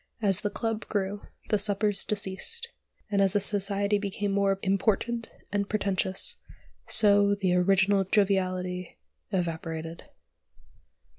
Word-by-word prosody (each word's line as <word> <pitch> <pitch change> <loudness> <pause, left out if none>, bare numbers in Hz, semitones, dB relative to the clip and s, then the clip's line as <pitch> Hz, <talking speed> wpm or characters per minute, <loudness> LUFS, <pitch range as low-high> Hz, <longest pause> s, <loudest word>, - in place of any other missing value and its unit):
As 200 -3 +2
the 205 - -1
club 225 0 -3
grew, 200 0 -2 0.3
the 210 - +2
suppers 205 0 +1
deceased; 210 - -2 0.4
and, 200 -1 +2
as 195 -1 +3
the 205 - +3
society 200 0 0
became 200 0 -2 0.3
important 215 +4 0 0.2
and 200 0 -1
pretentious, 195 -2 -1 0.5
so 205 -1 +4
the 190 -3 0
original 195 +2 +3
joviality 185 -2 0 0.3
evaporated. 165 -3 -4
200 Hz, 105 wpm, -28 LUFS, 190-205 Hz, 0.5 s, so